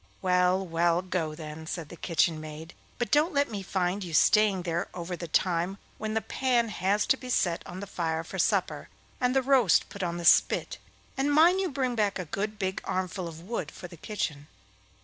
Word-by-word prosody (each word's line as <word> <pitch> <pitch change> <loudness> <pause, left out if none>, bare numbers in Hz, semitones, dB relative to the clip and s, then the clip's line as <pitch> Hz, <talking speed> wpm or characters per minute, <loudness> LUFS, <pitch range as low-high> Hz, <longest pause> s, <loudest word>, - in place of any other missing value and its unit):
'Well, 180 0 +2
well, 170 +1 +1
go 175 -4 -2
then!' 155 0 -8
said 165 -3 -5
the - - -9
kitchen 165 -1 +1
maid, 155 +2 -9 0.2
'but 240 - -2
don't 300 +2 +3
let 285 -3 +2
me 205 -2 -4
find 190 +1 -1
you 170 -3 -4
staying 210 -2 +4
there 170 0 -2
over 175 0 -4
the 170 0 -7
time 175 +3 0 0.2
when 215 0 -3
the 220 - +1
pan 245 -2 +1
has 205 +1 +1
to 265 - +3
be 255 - -9
set 175 -8 +1
on 185 +2 -7
the - - -5
fire 165 -4 -2
for - - -7
supper, - - 0 0.3
and 250 +1 +1
the 265 - +3
roast 255 -8 +4
put 200 0 -8
on 175 -1 -2
the 170 - -5
spit; - - +4 0.4
and 275 +2 +1
mind 335 +5 +5
you 375 - -1
bring 265 -3 -1
back 210 -3 0
a 185 - -4
good 210 +6 -3
big 190 -2 -2
armful 185 -1 -3
of 165 -1 -9
wood 225 +7 -4
for 175 - -9
the 175 - -12
kitchen. 155 -6 -4
185 Hz, 205 wpm, -28 LUFS, 170-220 Hz, 0.4 s, mind